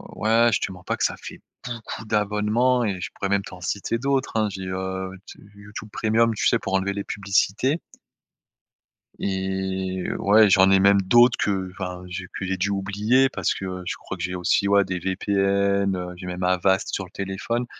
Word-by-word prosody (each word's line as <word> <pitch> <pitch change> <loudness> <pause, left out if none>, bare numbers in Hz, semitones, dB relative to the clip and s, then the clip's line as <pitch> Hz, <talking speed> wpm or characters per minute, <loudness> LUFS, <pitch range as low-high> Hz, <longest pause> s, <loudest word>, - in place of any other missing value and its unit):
ouais 115 +2 +3
je - - +2
te - - -2
mens 90 -1 -12
pas - - -2
que - - -2
ça - - 0
fait - - -10 0.2
beaucoup 115 -2 -6
d'abonnements 105 +4 +1
et 95 -3 -2
je - - -4
pourrais 100 - -3
même 100 0 +2
t'en 90 - -11
citer 100 +5 -2
d'autres 135 0 0
hein. 110 -1 +2
J'ai, 95 -1 -6
heu, 95 0 -4 0.3
YouT - - -18
YouTube 100 +1 -9
Premium, 115 +1 +2
tu - - -1
sais? 115 - +3
Pour 95 - -5
enlever 95 +1 +1
les 100 0 -4
publicités. 100 - 0 1.4
Et 95 -1 -2
ouais, 105 +1 +5
j'en 95 0 +5
ai 95 - +6
même 100 0 +5
d'autres 120 +6 +5
qu'enfin, 95 -2 -3
j'ai 90 0 -6
pu 95 - -5
j'ai 95 - 0
dû 95 +2 -1
oublier 105 +7 +2
parce - - -1
que, 95 - -6
heu, 90 -1 -5
je - - -3
crois 95 - -7
que 85 - -6
j'ai 90 - -2
aussi, 90 +2 +1
ouais, 100 0 +4
des 95 -1 -3
VPN, 100 +1 +1
heu, 90 0 -5
j'ai 90 - -10
même 90 0 -4
Avast 95 +1 +2
sur 95 - -1
le 90 - -12
téléphone 100 +5 -3
100 Hz, 200 wpm, -24 LUFS, 95-105 Hz, 1.4 s, ai